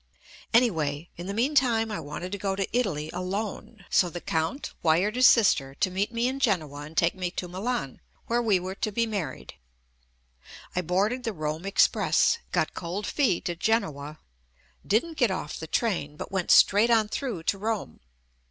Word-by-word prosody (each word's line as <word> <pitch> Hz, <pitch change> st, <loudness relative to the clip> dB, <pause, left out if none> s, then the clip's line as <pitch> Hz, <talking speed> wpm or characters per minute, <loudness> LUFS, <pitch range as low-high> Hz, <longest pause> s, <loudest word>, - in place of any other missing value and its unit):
Anyway, 165 Hz, -, +1 dB
in 175 Hz, +2 st, -7 dB
fie 200 Hz, -, -3 dB
meantime 235 Hz, -3 st, +2 dB
I 210 Hz, -, -3 dB
wanted 165 Hz, +4 st, -6 dB
to 200 Hz, -, -4 dB
go 195 Hz, 0 st, -1 dB
to 195 Hz, -1 st, -1 dB
Italy 160 Hz, -11 st, -1 dB
alone, 195 Hz, +2 st, -5 dB
so 180 Hz, -, +4 dB
the 175 Hz, -, -6 dB
Count 165 Hz, -, -2 dB
wired 175 Hz, +7 st, +2 dB
his 255 Hz, 0 st, +7 dB
sister 140 Hz, -, +4 dB
to 185 Hz, -, 0 dB
meet 195 Hz, +4 st, -1 dB
me 235 Hz, +1 st, 0 dB
in 265 Hz, +1 st, -2 dB
Genoa 160 Hz, -, 0 dB
and 155 Hz, +2 st, -10 dB
take 170 Hz, 0 st, +3 dB
me 180 Hz, -1 st, -3 dB
to 180 Hz, 0 st, -5 dB
Milan, 190 Hz, -, -3 dB, 0.2 s
where 240 Hz, +1 st, +1 dB
we 210 Hz, -5 st, +3 dB
were 185 Hz, +1 st, -5 dB
to 215 Hz, +2 st, -3 dB
be 230 Hz, +3 st, +1 dB
married. 195 Hz, -, -5 dB, 1.2 s
I 180 Hz, -, +1 dB
boarded 200 Hz, +9 st, 0 dB
the 225 Hz, -, -2 dB
Rome 155 Hz, +2 st, -4 dB
Express, 210 Hz, -, +3 dB
got -, -, 0 dB
cold 185 Hz, +4 st, -4 dB
feet 245 Hz, -, +1 dB
at 170 Hz, -1 st, -4 dB
Genoa, 155 Hz, -10 st, -1 dB, 0.7 s
didn't 315 Hz, +10 st, 0 dB
get 245 Hz, -5 st, +3 dB
off 185 Hz, -5 st, -4 dB
the 160 Hz, -, -6 dB
train, 160 Hz, -7 st, -1 dB
but -, -, -7 dB
went 190 Hz, -2 st, -2 dB
straight 210 Hz, +4 st, +6 dB
on 225 Hz, -2 st, +4 dB
through 215 Hz, -6 st, -4 dB
to 195 Hz, -, 0 dB
Rome. 220 Hz, 0 st, -3 dB
195 Hz, 180 wpm, -27 LUFS, 165-225 Hz, 1.2 s, his